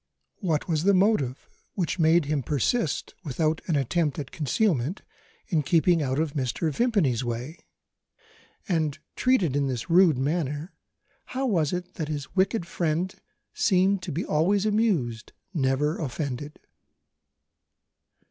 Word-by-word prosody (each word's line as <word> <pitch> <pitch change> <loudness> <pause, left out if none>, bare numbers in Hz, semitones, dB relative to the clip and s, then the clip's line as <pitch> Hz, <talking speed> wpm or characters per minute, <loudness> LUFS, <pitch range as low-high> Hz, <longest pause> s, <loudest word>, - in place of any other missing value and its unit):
What 165 -7 -1
was 160 -3 0
the 200 +1 +4
motive 185 - +1 0.3
which 180 -1 -1
made 165 0 +4
him 145 -1 0
persist, 150 - -1
without 155 +1 0
an 165 - +1
attempt 145 +2 0
at 145 -4 -5
concealment, 160 - 0 0.5
in 165 -6 +2
keeping 165 +3 +3
out 130 -2 -1
of 155 -2 0
Mr. 140 +3 -1
Vimpany's 170 - +1
way? 120 +7 -4 1.1
And, 155 -6 0 0.2
treated 205 - +2
in 140 -1 +1
this 125 +2 -3
rude 170 -5 +6
manner, 150 +3 -2 0.6
how 270 - +1
was 170 - +1
it 180 0 -4
that 160 -4 -2
his 145 0 -5
wicked 195 0 +1
friend 170 +1 -1 0.4
seemed 190 0 +2
to - - -5
be 165 +6 -2
always 185 +7 +2
amused, 190 - 0 0.2
never 145 0 +1
offended? 145 0 -4
160 Hz, 130 wpm, -26 LUFS, 140-185 Hz, 1.1 s, rude